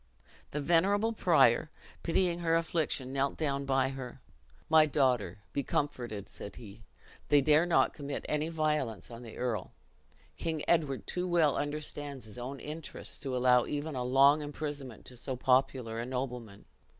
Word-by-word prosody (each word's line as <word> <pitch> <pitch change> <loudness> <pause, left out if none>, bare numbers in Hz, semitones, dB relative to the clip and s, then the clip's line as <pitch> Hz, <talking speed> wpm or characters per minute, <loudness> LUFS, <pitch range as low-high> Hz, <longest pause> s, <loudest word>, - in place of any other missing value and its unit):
The 150 - -3
venerable 200 +8 +3
prior, 160 - +4 0.3
pitying 175 0 +1
her 165 -1 +2
affliction, 160 -5 -1
knelt 140 0 0
down 140 -3 -1
by 135 -1 +2
her. 135 -1 -7 0.5
"My 155 -1 +6
daughter, 125 - +1 0.2
be 140 - 0
comforted," 120 -7 -2
said 100 - -9
he; 110 -2 -11 0.5
"they 145 - +6
dare 150 +4 +4
not 170 - +3
commit 140 -2 -5
any 150 +1 0
violence 150 -9 -1
on 115 0 -8
the 115 -2 -10
earl. 115 -6 -2 0.6
King 160 -2 -2
Edward 150 -6 +1
too 180 0 -2
well 165 -6 +3
understands 145 -2 -4
his 110 +2 -9
own 130 +3 -5
interest 155 +1 -6
to 130 -2 -2
allow 125 -1 +4
even 150 +2 -3
a 125 -2 -2
long 135 +4 +5
imprisonment 145 -5 -6
to 125 - -8
so 130 +2 -4
popular 125 -2 +1
a 120 - -2
nobleman." 125 -5 -5
140 Hz, 155 wpm, -31 LUFS, 125-155 Hz, 0.6 s, My